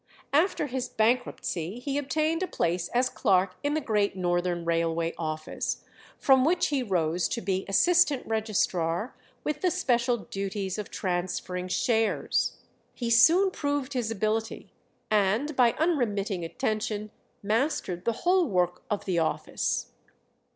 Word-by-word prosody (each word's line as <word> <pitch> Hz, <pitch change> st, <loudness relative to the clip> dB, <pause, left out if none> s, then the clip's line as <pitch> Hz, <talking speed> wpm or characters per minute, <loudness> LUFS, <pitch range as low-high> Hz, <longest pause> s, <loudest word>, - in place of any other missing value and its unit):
After 315 Hz, +2 st, +2 dB
his 260 Hz, -2 st, -3 dB
bankruptcy 220 Hz, -5 st, 0 dB
he 280 Hz, +3 st, -2 dB
obtained 310 Hz, +4 st, 0 dB
a 375 Hz, -, 0 dB
place 170 Hz, -, -1 dB
as 250 Hz, +1 st, +1 dB
clerk 190 Hz, -6 st, +2 dB
in 290 Hz, +1 st, 0 dB
the -, -, +2 dB
Great 210 Hz, -6 st, 0 dB
Northern 175 Hz, -1 st, -1 dB
Railway 165 Hz, 0 st, 0 dB
office, 155 Hz, -1 st, -4 dB, 0.3 s
from 265 Hz, -2 st, +4 dB
which 340 Hz, +5 st, +2 dB
he 285 Hz, -3 st, 0 dB
rose 175 Hz, -6 st, 0 dB
to -, -, -3 dB
be 190 Hz, 0 st, -1 dB
assistant 315 Hz, -, +4 dB
registrar, 210 Hz, -3 st, -1 dB, 0.3 s
with 300 Hz, -1 st, -2 dB
the 365 Hz, -, +3 dB
special 245 Hz, -5 st, +1 dB
duties 195 Hz, -1 st, -4 dB
of 210 Hz, -, -5 dB
transferring 180 Hz, 0 st, -3 dB
shares. 225 Hz, +1 st, +1 dB, 0.4 s
He 235 Hz, -2 st, -2 dB
soon 335 Hz, +12 st, +6 dB
proved 285 Hz, -3 st, -2 dB
his 245 Hz, -4 st, -1 dB
ability, 220 Hz, +1 st, -2 dB, 0.4 s
and 215 Hz, +8 st, +2 dB
by 245 Hz, -3 st, +4 dB
unremitting 215 Hz, -, 0 dB
attention 215 Hz, +4 st, -2 dB, 0.3 s
mastered 210 Hz, -, -1 dB
the 230 Hz, -, +1 dB
whole 360 Hz, -1 st, +4 dB
work 180 Hz, -5 st, 0 dB
of 210 Hz, -, -2 dB
the 180 Hz, -3 st, +1 dB
office. 160 Hz, -, -1 dB
215 Hz, 135 wpm, -27 LUFS, 185-270 Hz, 0.4 s, soon